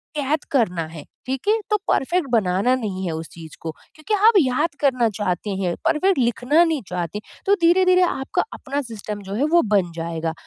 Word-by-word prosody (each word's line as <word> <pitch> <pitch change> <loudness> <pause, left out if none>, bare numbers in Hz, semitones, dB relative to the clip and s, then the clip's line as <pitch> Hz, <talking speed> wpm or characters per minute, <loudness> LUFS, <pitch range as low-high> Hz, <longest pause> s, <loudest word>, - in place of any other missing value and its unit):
कैद 295 +1 -1
करना 215 - +1
है। 160 -3 -9 0.2
ठीक 265 +8 -4
है 445 +1 +3
तो 425 - +3
परफ़ेक्ट 340 +3 +1
बनाना 205 +2 +2
नहीं 200 -6 -4
है 170 - -2
उस 160 0 -6
चीज़ 160 -2 -12
को 160 - -4 0.2
क्योंकि 310 +7 -4
आप 460 - +7
याद 290 +2 +1
करना 255 -5 +2
चाहते 205 -1 -2
हैं 180 -3 -1
परफ़ेक्ट 375 +4 +2
लिखना 250 +7 +3
नहीं 320 -4 0
चाहते 175 +3 -4
हैं। - - -20
तो 400 - +4
धीरे-धीरे 365 +2 +5
आपका 270 -6 0
अपना 280 +2 -3
सिस्टम 210 -2 -6
जो 195 - -4
है 255 - 0
वो 345 - +7
बन 180 -4 +1
जाएगा। 165 -1 -3
245 Hz, 195 wpm, -22 LUFS, -, 0.2 s, आप